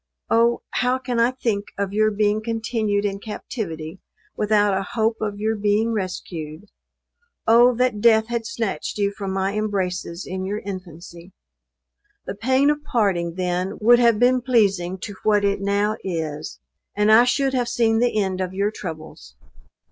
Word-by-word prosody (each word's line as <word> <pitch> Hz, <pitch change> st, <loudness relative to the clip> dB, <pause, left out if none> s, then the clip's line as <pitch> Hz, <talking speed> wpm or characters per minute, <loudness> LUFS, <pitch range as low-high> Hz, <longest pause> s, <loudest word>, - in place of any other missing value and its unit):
Oh! 235 Hz, +1 st, +3 dB
how 250 Hz, +1 st, +1 dB
can 250 Hz, -2 st, -3 dB
I 235 Hz, +1 st, +4 dB
think 230 Hz, -6 st, -2 dB
of 200 Hz, -1 st, -2 dB
your 215 Hz, +1 st, +3 dB
being 210 Hz, 0 st, +1 dB
continued 220 Hz, -2 st, -1 dB
in 200 Hz, -1 st, -2 dB
captivity 190 Hz, -6 st, -6 dB, 0.4 s
without 210 Hz, -2 st, +2 dB
a 190 Hz, -, 0 dB
hope 220 Hz, +2 st, -1 dB
of 210 Hz, -2 st, -3 dB
your 220 Hz, +1 st, 0 dB
being 210 Hz, +2 st, +1 dB
rescued? 180 Hz, -3 st, -5 dB, 0.7 s
O 240 Hz, +2 st, +5 dB
that 250 Hz, -4 st, 0 dB
death 220 Hz, -1 st, +5 dB
had 235 Hz, -1 st, -3 dB
snatched 225 Hz, -3 st, -3 dB
you 200 Hz, -1 st, +1 dB
from 200 Hz, -1 st, -5 dB
my 190 Hz, +1 st, -1 dB
embraces 185 Hz, -4 st, -2 dB
in 185 Hz, 0 st, -4 dB
your 200 Hz, +2 st, -3 dB
infancy; 175 Hz, -2 st, -9 dB, 0.9 s
the -, -, -4 dB
pain 260 Hz, +7 st, +2 dB
of 295 Hz, 0 st, -4 dB
parting 190 Hz, -, 0 dB
then 180 Hz, 0 st, -2 dB
would 240 Hz, +3 st, +6 dB
have 235 Hz, -3 st, +4 dB
been 250 Hz, +2 st, +3 dB
pleasing 200 Hz, -8 st, +1 dB
to 205 Hz, -, -6 dB
what 210 Hz, -1 st, +2 dB
it 200 Hz, 0 st, 0 dB
now 205 Hz, +2 st, 0 dB
is; 160 Hz, -4 st, -4 dB, 0.4 s
and 210 Hz, +1 st, +3 dB
I 225 Hz, +2 st, +8 dB
should 265 Hz, +2 st, +1 dB
have 245 Hz, -2 st, 0 dB
seen 225 Hz, -2 st, +2 dB
the 240 Hz, -2 st, +1 dB
end 190 Hz, -2 st, -1 dB
of 185 Hz, 0 st, -4 dB
your 200 Hz, +2 st, 0 dB
troubles! 155 Hz, -, -9 dB
210 Hz, 165 wpm, -22 LUFS, 190-230 Hz, 0.9 s, I